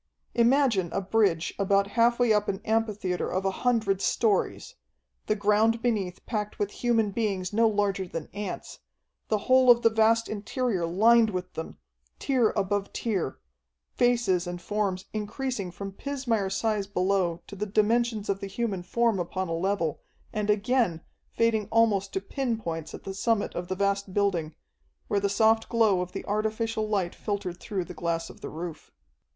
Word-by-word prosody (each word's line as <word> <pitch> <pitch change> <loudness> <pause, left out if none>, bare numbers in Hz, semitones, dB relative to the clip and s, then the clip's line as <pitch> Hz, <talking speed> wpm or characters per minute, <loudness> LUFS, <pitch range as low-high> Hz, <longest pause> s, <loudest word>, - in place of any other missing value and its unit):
Imagine 235 - +3
a - - +1
bridge 195 -4 +1
about 200 0 +3
half 235 0 +4
way 240 -3 +4
up 210 0 +1
an 195 - -2
amphitheatre 210 -5 0
of 190 +1 -1
a 195 - +2
hundred 215 -3 +1
stories, 210 -2 0 0.5
the 215 - +2
ground 215 +2 +2
beneath 205 -7 -1
packed 210 -2 -3
with 205 -1 -1
human 225 -4 +1
beings 195 -3 -2
no 225 +2 +4
larger 200 -3 0
than 165 -3 -5
ants, 200 -1 -6 0.5
the 215 - +1
whole 255 0 +5
of 240 -1 +7
the 230 - +5
vast 225 +1 +3
interior 210 -3 -2
lined 220 +6 +5
with 185 -2 -4
them, 160 - -6 0.4
tier 250 -5 +2
above 200 0 -1
tier, 195 - -2 0.6
faces 240 -8 +2
and 175 0 -4
forms 195 0 -2
increasing 215 -1 -3
from 195 +3 -7
pismire 235 -4 -2
size 205 0 0
below 185 -3 0
to - - -10
the 210 +2 -3
dimensions 220 +1 +1
of 195 -1 -1
the 200 - -5
human 200 -2 -2
form 230 +2 +1
upon 185 +1 -3
a - - -1
level, 170 -3 -1 0.3
and, 210 -2 -2
again, 210 -4 +2 0.3
fading 225 -3 +1
almost 220 -4 +2
to 385 - -1
pin 265 - -2
points 165 -6 -5
at - - -12
the 195 - -5
summit 210 +1 0
of 175 0 -4
the 185 - -2
vast 200 0 -1
building, 175 -7 0 0.5
where 200 - +2
the 200 0 0
soft 220 +2 +3
glow 220 -6 +3
of 180 0 -5
the - - -6
artificial 220 +1 -1
light 190 -5 0
filtered 195 -4 -4
through 195 -5 -3
the 180 - -9
glass 165 0 -2
of - - -17
the - - -5
roof. 165 0 -7
205 Hz, 170 wpm, -27 LUFS, 190-225 Hz, 0.6 s, of